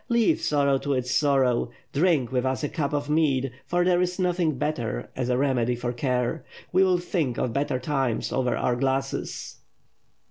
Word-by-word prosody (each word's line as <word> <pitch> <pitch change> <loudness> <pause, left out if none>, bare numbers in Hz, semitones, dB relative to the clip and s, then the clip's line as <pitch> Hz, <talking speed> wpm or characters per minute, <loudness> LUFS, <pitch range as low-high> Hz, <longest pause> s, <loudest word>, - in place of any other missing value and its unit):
Leave 235 -2 +3
sorrow 140 -2 +2
to 145 +1 -1
its 125 -1 -1
sorrow. 135 -5 +2 0.2
Drink 145 -6 +2
with 125 -1 +1
us 130 +2 -1
a 145 - 0
cup 150 -5 -2
of 145 -1 -1
mead, 140 -4 +1 0.2
for 175 0 +1
there 180 -1 +3
is 180 0 -1
nothing 175 -5 +1
better 125 -5 -3
as 125 -1 -2
a 125 - +2
remedy 125 -3 +1
for 120 0 -3
care. 125 -1 -1 0.3
We 185 +1 +4
will 185 -1 +3
think 165 -8 -2
of 120 - -1
better 140 -2 0
times 130 -2 -1
over 125 -2 0
our 125 - +1
glasses." 135 +1 -2
135 Hz, 180 wpm, -25 LUFS, 125-155 Hz, 0.3 s, We